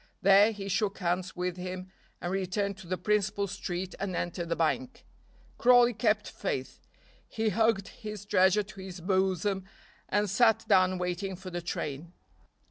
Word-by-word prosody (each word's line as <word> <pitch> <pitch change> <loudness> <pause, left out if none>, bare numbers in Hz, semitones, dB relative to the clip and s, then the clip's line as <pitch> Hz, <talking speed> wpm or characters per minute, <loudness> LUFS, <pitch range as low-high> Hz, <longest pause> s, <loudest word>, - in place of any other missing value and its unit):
There 200 +3 +7
he 200 -2 -6
shook 200 +1 0
hands 180 0 -1
with 180 0 -2
him 185 +1 -6 0.3
and 175 - -3
returned 195 +1 -1
to 190 -2 -12
the 185 +1 -1
principal 205 +1 0
street 185 -2 -4
and 195 -2 -3
entered 175 0 -3
the 170 - +1
bank. 240 +11 -1 0.5
Crawley 245 0 +6
kept 215 -2 +1
faith, - - -5 0.4
he 220 0 -1
hugged 220 -2 +1
his 210 -2 -8
treasure 190 +1 +4
to 195 -1 -13
his 185 -1 -8
bosom 190 +1 0 0.4
and 205 +1 +2
sat 225 +2 +3
down 185 -2 +4
waiting 180 +2 -3
for 185 0 -9
the 175 0 -3
train. 165 0 -5
190 Hz, 155 wpm, -29 LUFS, 180-210 Hz, 0.5 s, There